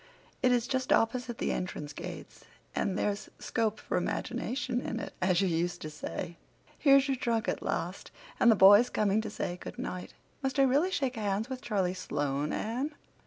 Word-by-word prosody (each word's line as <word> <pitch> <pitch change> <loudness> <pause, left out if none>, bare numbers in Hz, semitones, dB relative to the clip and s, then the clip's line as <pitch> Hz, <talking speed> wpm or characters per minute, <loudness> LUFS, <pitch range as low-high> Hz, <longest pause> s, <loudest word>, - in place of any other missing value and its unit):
It 255 -2 +4
is 240 -2 +3
just 260 0 -1
opposite 240 +1 +2
the - - -1
entrance 150 -5 -4
gates - - -8 0.3
and 190 0 0
there's 205 0 -1
'scope 220 -2 -1
for - - -2
imagination' 250 -1 -2
in 235 - -3
it, - - -6
as 185 0 +3
you 195 - +2
used 175 +1 0
to 155 - -5
say. 165 +2 -5 0.4
Here's 275 -1 +6
your 270 -1 0
trunk 230 -3 0
at - - -1
last—and 240 - -1
the 225 - +7
boys 205 +5 +8
coming 210 0 +2
to 220 - -5
say 175 - -3
good - - -8
night. 180 0 -5 0.3
Must 270 0 -1
I 275 - +6
really 280 +7 +3
shake 265 -8 -1
hands 210 +2 -1
with 255 -1 -4
Charlie 195 -7 0
Sloane, 145 -5 -2
Anne? 260 +7 -2
220 Hz, 180 wpm, -30 LUFS, 185-255 Hz, 0.4 s, boys